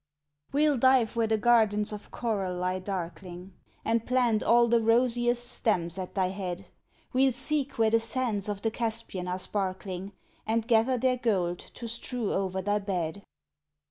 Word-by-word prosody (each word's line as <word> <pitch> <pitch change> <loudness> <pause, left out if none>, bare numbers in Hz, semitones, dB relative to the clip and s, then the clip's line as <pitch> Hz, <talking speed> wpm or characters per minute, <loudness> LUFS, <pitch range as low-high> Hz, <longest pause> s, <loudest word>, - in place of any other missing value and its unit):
We'll 290 -1 +3
dive 260 -3 +4
where 230 -1 +2
the 220 0 +2
gardens 215 -2 +3
of 210 - -8
coral 200 -6 -2
lie 185 +1 -1
darkling, 180 0 -6 0.3
And 225 0 +1
plant 245 -3 +2
all 235 0 +5
the 235 0 +3
rosiest 240 +1 +2
stems 175 -8 -1
at 185 +2 -6
thy 185 -2 +1
head; 185 -2 -5 0.5
We'll 260 0 +4
seek 275 +1 -2
where 220 -1 +3
the 230 - +4
sands 225 -3 -2
of 200 -1 -4
the 225 - +1
Caspian 225 -5 -3
are 180 0 -1
sparkling, 190 0 -4 0.3
And 225 0 0
gather 240 +2 +3
their 255 +1 +2
gold 185 -7 0
to 235 - -9
strew 235 0 -3
over 190 -1 -1
thy 205 +2 +1
bed. 190 -2 -3
220 Hz, 160 wpm, -28 LUFS, 190-240 Hz, 0.5 s, all